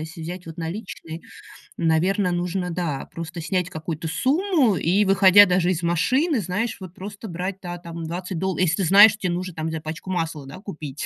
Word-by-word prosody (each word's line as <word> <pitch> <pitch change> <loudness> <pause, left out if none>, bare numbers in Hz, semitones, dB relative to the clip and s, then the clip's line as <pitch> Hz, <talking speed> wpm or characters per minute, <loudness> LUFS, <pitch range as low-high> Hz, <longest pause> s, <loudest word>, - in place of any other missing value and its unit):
если 160 +2 -8
взять 180 +1 -7
вот 165 +1 -9
наличные, 165 -2 -6 0.6
наверно, 180 +4 +1
нужно, 180 +1 -2
да, 165 -6 -3
просто 165 +1 -6
снять 180 +1 -1
какую-то 160 -1 -5
сумму 280 - +2
и, 180 +7 +2
выходя 195 +1 +7
даже 180 0 +2
из 170 -1 -3
машины, 250 - +2
знаешь, 205 +6 -2
вот 185 -2 -9
просто 200 +3 -8
брать, 185 +2 -4
да, 175 -1 -6
там 170 -1 -7
20 180 +2 -5
долл 190 0 -1
если 185 +1 +1
знаешь, 200 +5 +8
что 215 - -10
те 180 - 0
нужно 180 +1 -3
там 160 0 -3
за 160 -1 -4
пачку 155 +4 -7
масла, 165 -5 -3
да, 140 - -9
купить, 155 -8 -7
180 Hz, 190 wpm, -23 LUFS, 165-195 Hz, 0.6 s, знаешь